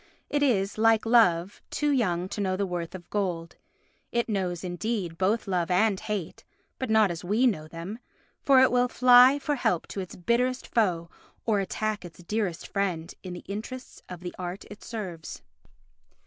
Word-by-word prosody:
It 290 0 +1
is, 215 -7 +1
like 225 0 +4
Love, 200 -6 +3
"too 295 -1 0
young 185 -9 +1
to 205 - -4
know 190 -1 0
the 200 - 0
worth 175 -1 -4
of 175 -2 -10
gold." 175 -5 -2 0.5
It 235 0 0
knows, 185 -5 -2
indeed, 180 -1 -3
both 200 +6 0
love 180 -3 0
and 195 +2 +3
hate, 205 -6 -4 0.4
but 260 - -3
not 220 -3 +4
as 170 +1 -6
we 210 +8 +2
know 175 -11 +1
them, 170 +7 -7 0.4
for 275 -3 +5
it 260 - +5
will 250 0 +3
fly 250 +2 +7
for 295 +1 -1
help 180 - 0
to - - -5
its 185 -2 -6
bitterest 245 +7 0
foe, 175 -7 0 0.3
or 215 -3 +2
attack 215 +2 -2
its 175 0 -11
dearest 195 -3 -2
friend 180 -5 -2
in 185 -2 -7
the 175 - -9
interests 225 +6 -7
of 180 -1 -8
the 180 -1 -6
art 180 +2 -5
it 205 - -11
serves. 185 -9 -6
200 Hz, 175 wpm, -27 LUFS, 175-230 Hz, 0.5 s, fly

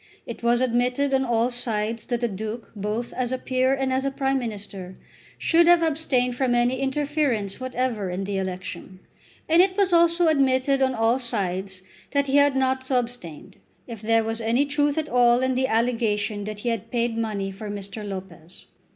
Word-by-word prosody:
It 235 - -7
was 240 +1 +2
admitted 250 +3 +1
on 265 0 +3
all 240 0 +1
sides 230 -2 -2
that 240 -2 -1
the 240 - +2
Duke, 220 +3 -6
both 210 +4 -3
as 250 -1 -2
a 260 - 0
peer 255 0 0
and 265 -1 -1
as 260 +1 0
a 275 - +1
Prime 270 0 0
Minister, 200 -5 -7 0.4
should 335 0 +3
have 345 -1 +6
abstained 275 -6 0
from 250 -1 +1
any 245 +2 +1
interference 270 -7 -1
whatever 255 -6 -2
in 180 +2 -3
the 195 0 -2
election. 185 0 -6 0.5
And 330 +2 +6
it 375 +1 +1
was 390 -3 +2
also 340 0 +4
admitted 275 -2 +2
on 260 -1 +2
all 225 +3 +2
sides 190 -5 -2 0.3
that 280 0 +2
he 275 +1 +2
had 285 -1 +4
not 260 0 +1
so 260 -1 0
abstained, 235 -11 -5 0.3
if 230 -4 -9
there 225 +1 +2
was 225 +1 -3
any 235 +5 +2
truth 290 0 0
at 310 -1 -1
all 245 -2 +4
in 260 0 +1
the 260 +1 +1
allegation 220 -3 0
that 210 -1 -6
he 240 - -1
had 230 -4 -3
paid 235 -1 -1
money 210 -4 -2
for 205 +2 -8
Mr. 205 +1 -6
Lopez. 185 -4 -9
240 Hz, 190 wpm, -24 LUFS, 210-265 Hz, 0.5 s, have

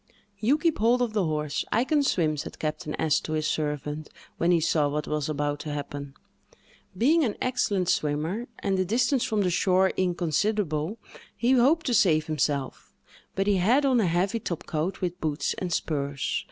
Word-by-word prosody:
"You 240 +8 +3
keep 325 +1 0
hold 235 +3 +3
of 230 -3 -2
the 205 -4 +1
horse—I 155 +8 -1
can 295 +2 +2
swim," 165 - +1
said 145 - -6
Captain 155 -1 -3
S—— 155 -2 +2
to 155 - -5
his 155 -1 -1
servant, 150 0 -2 0.3
when 170 - +2
he 175 -1 +4
saw 150 -2 +2
what 150 +1 -2
was 150 -1 -2
about 145 -1 -1
to 150 -1 -5
happen. 140 -1 -6 0.8
Being 310 - +4
an 220 -6 -1
excellent 205 -7 0
swimmer, 160 +9 -1
and 195 -2 -1
the - - +3
distance 245 +6 +1
from 215 -2 0
the 180 -2 +1
shore 185 +2 +3
inconsiderable, 180 0 0 0.4
he 240 +2 +2
hoped 270 +6 +4
to 250 - 0
save 160 -8 +4
himself, 145 -3 -2 0.4
but 195 - 0
he 205 -1 +3
had 240 +11 +3
on 260 -3 +3
a 205 - +2
heavy 185 +7 0
top 170 -6 -5
coat, 165 +4 -3
with 180 0 -3
boots 150 -1 -1
and 180 -2 -3
spurs. 140 -4 -1
175 Hz, 180 wpm, -26 LUFS, 150-220 Hz, 0.8 s, he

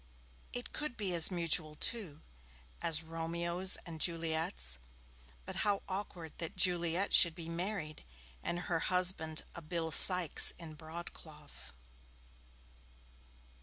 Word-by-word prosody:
It 245 - -8
could 300 -5 -6
be 200 -5 -3
as 165 -2 +3
mutual, 165 -3 -1
too, 175 -5 -4 0.6
as 160 -1 -2
Romeo's 170 +3 -2
and 165 -3 -10
Juliet's. 160 - 0 0.7
But - - -8
how 205 -2 -2
awkward 185 -4 -8
that 165 -1 -6
Juliet 175 +1 0
should 170 -3 +5
be 170 -2 -10
married 170 -2 -6 0.4
and 175 +1 -6
her 170 -2 -3
husband 180 -3 +1
a 170 - -10
Bill 165 0 -6
Sykes 180 +1 +8
in 165 -3 -11
broad 160 +2 -10
cloth! 150 -2 -14
170 Hz, 120 wpm, -31 LUFS, 160-180 Hz, 0.7 s, Sykes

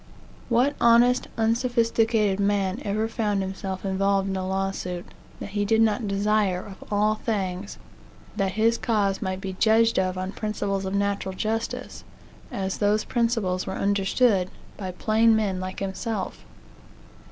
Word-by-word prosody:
What 255 +5 +3
honest, 235 +2 +5
unsophisticated 225 -3 +2
man 200 +2 0
ever 215 +2 0
found 210 -3 -1
himself 190 0 -5
involved 195 0 +1
in 190 - -2
a 185 0 -2
lawsuit, 190 -2 -2 0.3
that - - -6
he 205 +1 -1
did 220 +2 +2
not 220 0 +2
desire, 200 -2 +1
of 195 -1 -11
all 210 +1 +3
things, 200 -3 -3 0.6
that 195 -3 0
his 225 +3 +2
cause 205 -4 0
might 190 -2 -2
be 190 -1 -5
judged 225 +3 +3
of 185 0 0
on 185 +1 -3
principles 200 -2 -2
of 190 +1 -2
natural 200 -1 -1
justice, 220 +3 -3 0.5
as 190 -1 -3
those 210 +1 +2
principles 225 -7 0
were 190 - -3
understood 200 0 +2 0.3
by 190 -3 -5
plain 220 +4 +3
men 200 -4 0
like 185 +1 -5
himself? 195 +1 -4
200 Hz, 140 wpm, -25 LUFS, 190-225 Hz, 0.6 s, honest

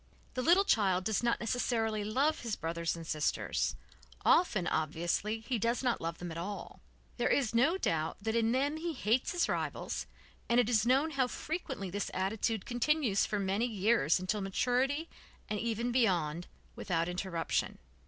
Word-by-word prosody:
The 255 - -2
little 345 +8 +5
child 190 - +3
does 215 +1 0
not 240 -1 +1
necessarily 225 -2 0
love 275 +9 +1
his 230 -3 -3
brothers 165 0 -2
and 165 -1 -8
sisters, 155 -1 -1 0.5
often, 210 - +4
obviously, 170 +8 -1
he 235 +1 -2
does 235 +5 0
not 245 -2 +1
love 165 0 -3
them 175 -1 -6
at 165 - -5
all. 200 +4 -6 0.4
There - - +1
is 255 -6 +2
no 275 +10 +3
doubt 160 - -1
that 220 +2 -2
in 230 -1 +2
them 280 +5 +1
he 335 +1 -3
hates 235 -1 +1
his 355 -1 +1
rivals - - -3 0.4
and 235 +1 +4
it 245 -2 +3
is 230 -1 +3
known 275 +6 +3
how 270 -3 +1
frequently 250 - -4
this 205 +2 -2
attitude 205 +2 -1
continues 245 -3 +1
for 210 - -1
many 200 +4 0
years 205 - +2
until 195 +3 -1
maturity, 255 - 0 0.4
and 210 - -2
even 235 +2 -1
beyond, 175 -9 +1 0.3
without 170 -3 -1
interruption. 180 -2 -2
220 Hz, 165 wpm, -32 LUFS, 185-250 Hz, 0.5 s, little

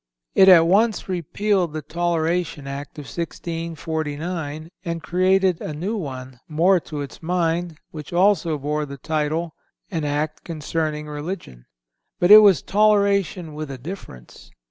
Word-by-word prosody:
It 190 0 +7
at 170 -3 +8
once 210 +5 +2
repealed 185 0 0
the 155 -1 -4
Toleration 170 -2 -1
Act 140 +2 -7
of 150 - -7
1649 160 0 -4
and 170 -2 -4
created 185 0 +2
a 150 - -5
new 190 +9 -3
one, 130 - -6
more 175 +4 +3
to 150 -2 -6
its 140 - -8
mind, 170 -1 -1
which 155 -2 -9
also 175 -3 +2
bore 150 +1 -2
the 140 0 -8
title: 155 +3 -2 0.4
"An 165 -4 -2
Act 150 +1 -2
concerning 155 -1 -3
Religion," 150 - -7 0.5
but 175 +3 +3
it 215 - +13
was 200 -8 +5
toleration 200 -5 +2
with 155 -1 -6
a 135 - -6
difference. 125 - -10
165 Hz, 140 wpm, -22 LUFS, 150-180 Hz, 0.5 s, it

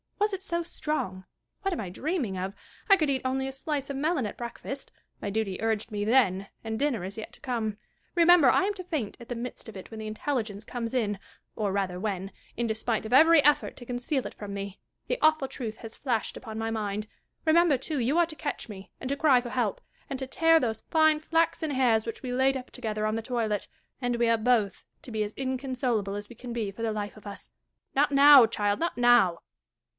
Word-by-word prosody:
Was 415 0 +2
it 385 - -3
so 340 -3 -2
strong'? 190 - -3 0.4
What 390 -1 0
am - - -3
I 190 - -5
dreaming 260 - -2
of? 190 +2 -3 0.4
I 395 - +9
could 310 -6 0
eat 265 -2 +1
only 265 +1 0
a - - -3
slice 275 +1 -3
of 280 - -3
melon 300 -3 +1
at 210 - -5
breakfast; 245 +3 -6 0.3
my 205 - -2
duty 200 -2 -2
urged 220 0 -1
me 205 -1 -2
then, 200 -5 +3 0.2
and 220 0 -3
dinner 275 -9 0
is 195 +3 -6
yet 220 - -7
to - - -16
come. 225 -5 -2 0.4
Remember, 340 -5 +7
I - - +4
am 410 +2 +1
to 370 - -7
faint 310 - -3
at 235 - -12
the 245 - -2
midst 240 +1 -6
of 220 - -11
it 190 - -10
when 220 - -7
the 215 - -5
intelligence 215 -2 -3
comes 230 0 -4
in, 205 -5 0 0.4
or 210 -3 -1
ratlier 190 -2 -1
when, 195 -1 -3 0.3
in 240 - 0
despite 220 0 -1
of 220 - -4
every 315 +2 +7
effort 295 +1 +3
to 245 - -10
conceal 250 +3 -2
it - - -6
from 205 -1 -7
me, 200 0 -6 0.3
the - - -1
awful 310 -3 +4
truth 225 -4 -5
has 225 -1 -9
flashed 240 -5 -1
upon 220 -3 -7
my 225 0 -2
mind. 210 -1 -2 0.4
Remember, 325 -2 +5
too, 285 +3 -3
you 255 +7 +1
are 345 - +5
to 315 - -7
catch 290 -5 -4
me, 195 -2 -10
and 255 - -5
to 280 - -1
cry 280 -5 +5
for 240 - -6
help, 235 -5 -1 0.3
and 270 - -3
to 265 - -4
tear 325 +5 +4
those 225 -5 -2
fine 315 -1 +3
flaxen 325 -1 +1
hairs 245 -5 +3
which 230 - -6
we 255 - -3
laid 265 +1 +3
up 255 - -9
together 215 -4 -3
on 215 0 0
the 225 - -1
toilet; 225 -4 -1 0.3
and 245 -2 0
we 235 0 +2
are 230 - +4
both 220 -4 +1 0.2
to 250 - -9
be 215 -1 0
as 210 +1 -5
inconsolable 255 -6 -1
as 205 0 -5
we 240 - -11
can 240 +1 -7
be 220 -4 -2
for 210 - -10
the 225 -1 0
life 205 0 -4
of 210 - -12
us. 200 - -9 0.4
Not 290 +2 +3
now, 280 -3 +9
child, 205 -2 0
not 335 -5 -1
now. 240 -8 +5
240 Hz, 230 wpm, -28 LUFS, 215-280 Hz, 0.4 s, I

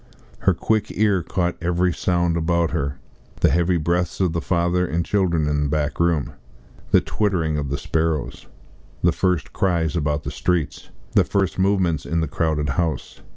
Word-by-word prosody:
Her - - +2
quick 110 -1 0
ear 100 -4 +3
caught 90 +1 -1
every 90 +1 +1
sound 85 -1 +1
about 85 0 +1
her 70 -5 -2 0.4
the - - +5
heavy 85 +3 +2
breaths 85 +2 -1
of 90 -4 +1
the 85 - -1
father 85 +1 +1
and 85 -1 -1
children 85 -7 +1
in 75 0 0
the - - -1
back 75 0 -1
room, 85 -4 +1 0.6
the - - +5
twittering 90 -7 0
of 70 -2 -3
the 70 - -1
sparrows, 80 -2 -2 0.6
the - - +5
first 90 -3 -1
cries 85 -4 0
about 75 -2 0
the 70 - -4
streets, 75 +2 -2 0.2
the - - +4
first 95 -2 -1
movements 95 -6 +1
in 85 - 0
the 80 - 0
crowded 75 -1 -1
house. 80 +4 -2
85 Hz, 170 wpm, -22 LUFS, 75-90 Hz, 0.6 s, the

